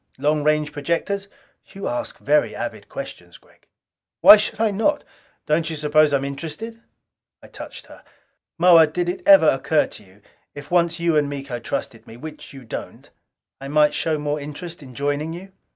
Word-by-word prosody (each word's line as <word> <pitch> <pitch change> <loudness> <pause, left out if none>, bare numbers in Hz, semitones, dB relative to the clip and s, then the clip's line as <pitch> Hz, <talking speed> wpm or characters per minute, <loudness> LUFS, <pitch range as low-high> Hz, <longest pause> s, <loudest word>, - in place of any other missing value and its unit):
Long 150 0 +1
range 150 0 +1
projectors?" 170 +7 -2 0.4
"You 195 0 -7
ask 300 0 -4
very - - +1
avid - - -6
questions, - - -9
Gregg!" - - -27 0.5
"Why - - +11
should 215 +1 -2
I 225 -1 +2
not? 290 +9 0 0.4
Don't 155 +1 0
you 160 - -4
suppose 150 0 +3
I'm 140 -1 +1
interested?" 165 +11 -6 0.6
I - - -12
touched - - -10
her. - - -16 0.5
"Moa, 170 -2 +7
did 175 +3 -2
it 180 +2 -3
ever 195 -5 +8
occur 150 +3 +1
to - - -12
you, 95 +1 -22 0.3
if 145 +2 -10
once 170 -1 +2
you 170 -1 +1
and 145 -1 +2
Miko 135 -3 -5
trusted - - -5
me 115 - -12
which 155 +4 -10
you 135 -2 -11
don't 110 - -8 0.5
I 135 - -8
might 150 +1 +3
show 160 -2 -1
more 150 0 -2
interest 150 +4 -8
in 130 -3 -13
joining 145 +4 -2
you?" 190 +3 -10
155 Hz, 175 wpm, -22 LUFS, 145-175 Hz, 0.6 s, Why